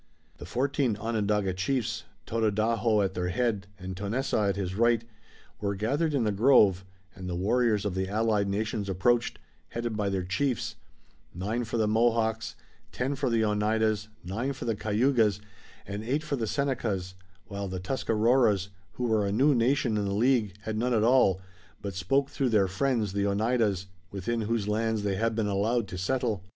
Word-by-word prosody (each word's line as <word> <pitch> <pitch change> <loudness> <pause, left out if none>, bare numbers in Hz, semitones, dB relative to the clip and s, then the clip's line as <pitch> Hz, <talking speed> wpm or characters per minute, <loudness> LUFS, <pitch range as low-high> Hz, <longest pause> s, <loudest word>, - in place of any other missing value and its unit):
The 85 - -8
fourteen 130 +1 0
Onondaga 105 -3 0
chiefs, 115 +6 -1 0.2
Tododaho 110 0 +1
at 95 -1 -1
their 90 -1 -2
head 105 -1 -1
and 95 0 -6
Tonessaah 105 +1 0
at 100 - 0
his 95 -2 -3
right, 115 +2 +3 0.6
were 100 -1 -1
gathered 145 - 0
in 130 - +2
the 105 - +1
grove, 100 -4 +5 0.3
and 90 0 -7
the 90 - -2
warriors 105 +2 +1
of 100 - -1
the 95 0 -2
allied 105 -1 +1
nations 105 0 -2
approached, 115 +6 +1 0.3
headed 120 -1 -3
by 105 -2 0
their 95 -2 -1
chiefs, 115 +8 -1 0.6
nine 110 +7 -2
for 110 +1 -3
the 110 -1 +2
Mohawks, 110 0 +1 0.4
ten 125 +10 -1
for 135 -1 -1
the 115 -1 +2
Oneidas, 105 0 +1 0.2
nine 115 +10 -2
for 135 - -7
the 115 -2 0
Cayugas, 110 0 +2 0.5
and 100 +2 -5
eight 140 +7 -1
for 150 -2 -2
the 115 -4 -2
Senecas, 110 -9 -1 0.3
while 100 -2 -5
the 95 0 -4
Tuscaroras, 110 -1 +2 0.2
who 125 - -5
were 110 -4 +2
a - - -1
new 135 +8 +4
nation 120 -2 +2
in 105 - 0
the 100 0 -1
League, 115 -4 +2
had 110 +1 -3
none 125 +1 +1
at 110 - +2
all, 115 -6 +4 0.4
but 100 -1 -5
spoke 135 +10 +1
through 135 -2 0
their 105 -4 +3
friends, 105 +1 0
the 100 0 +1
Oneidas, 105 -2 +1 0.2
within 105 +5 -2
whose 110 -1 -1
lands 110 0 0
they 100 -2 0
had 115 +1 0
been 110 -1 0
allowed 105 +3 0
to 90 - -6
settle. 110 -1 -1
110 Hz, 175 wpm, -28 LUFS, 100-120 Hz, 0.6 s, grove